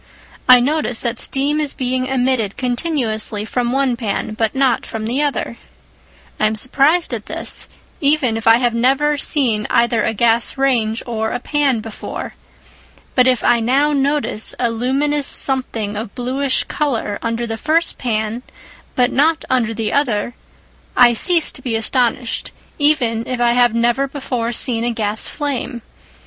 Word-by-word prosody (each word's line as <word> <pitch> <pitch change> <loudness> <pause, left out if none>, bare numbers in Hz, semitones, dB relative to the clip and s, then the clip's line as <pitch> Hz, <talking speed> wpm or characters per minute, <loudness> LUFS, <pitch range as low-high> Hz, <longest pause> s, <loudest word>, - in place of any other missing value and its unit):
I 250 -1 +9
notice 275 -2 -1
that 235 -1 -2
steam 285 +3 0
is 295 -2 -3
being 255 0 -1
emitted 255 -5 0
continuously 240 -5 -1
from 245 +2 -2
the 250 - -1
one 270 -3 +1
pan, 215 -2 -3
but 225 +2 -1
not 265 -3 +2
from 220 -1 -6
the 250 +6 -1
other. 285 -5 -2 0.8
I 215 - +3
am 220 - -2
surprised 275 +7 +2
at 220 -3 -5
this, - - -1 0.3
even 280 -5 +2
if 225 0 -4
I 225 0 +7
have 240 -1 0
never 270 +5 +2
seen 235 -8 +1
either 235 -1 +2
a 220 - -1
gas 230 +3 +1
range 235 -5 0
or 220 -2 -2
a - - -3
pan 275 -4 0
before. 220 -1 -7 0.8
But 255 0 +4
if 255 -1 +2
I 240 - +3
now 275 +6 +2
notice 280 -5 0
a 240 -2 +1
luminous 275 +5 0
something 230 -6 0
of 215 0 -6
bluish 260 +2 -1
colour 240 -8 -2
under 230 0 -2
the 225 -1 -4
first 330 +2 0
pan 220 -1 -2 0.5
but 250 0 +2
not 315 +3 +1
under 245 -3 +1
the 225 -1 -3
other, 240 -5 0 0.6
I 240 -1 +7
cease 335 - +3
to - - -9
be 245 -3 -2
astonished, 235 +1 0 0.3
even 250 -6 +1
if 255 -1 -3
I 240 0 +3
have 240 -1 +3
never 240 +4 +1
before 260 -4 -3
seen 235 -1 -1
a 240 - 0
gas 215 -1 0
flame. 270 -4 -4
245 Hz, 160 wpm, -18 LUFS, 225-275 Hz, 0.8 s, I